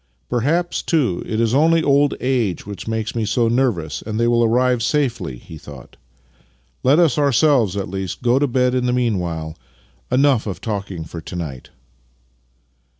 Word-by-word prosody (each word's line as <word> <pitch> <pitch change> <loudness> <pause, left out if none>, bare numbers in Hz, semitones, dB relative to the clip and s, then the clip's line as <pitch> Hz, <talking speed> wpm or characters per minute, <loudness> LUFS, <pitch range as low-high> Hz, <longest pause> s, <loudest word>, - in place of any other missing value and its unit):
" - - -45
Perhaps, 160 +9 0
too, 130 - 0
it 110 - -2
is 115 0 +1
only 160 +3 +4
old 140 0 +3
age 125 -8 -1
which 100 +1 -8
makes 110 0 -2
me 115 - 0
so 115 +2 +1
nervous, 115 - 0
and 110 0 -4
they 115 - +2
will 120 0 +3
arrive 125 +1 +2
safely," 120 - -1
he 80 +5 -12
thought. 70 -4 -12 0.5
" - - -39
Let 135 +4 +4
us 165 -6 +3
ourselves 135 - +3
at 100 - -2
least 95 +1 -5
go 125 +2 +3
to 145 - +2
bed 125 0 +1
in 125 -1 0
the 125 - +1
meanwhile. 90 -10 -2 0.6
Enough 130 -3 +3
of 95 - -4
talking 100 -6 -4
for 80 +1 -8
to 85 - -9
night." 75 -8 -6
115 Hz, 175 wpm, -20 LUFS, 95-130 Hz, 0.6 s, only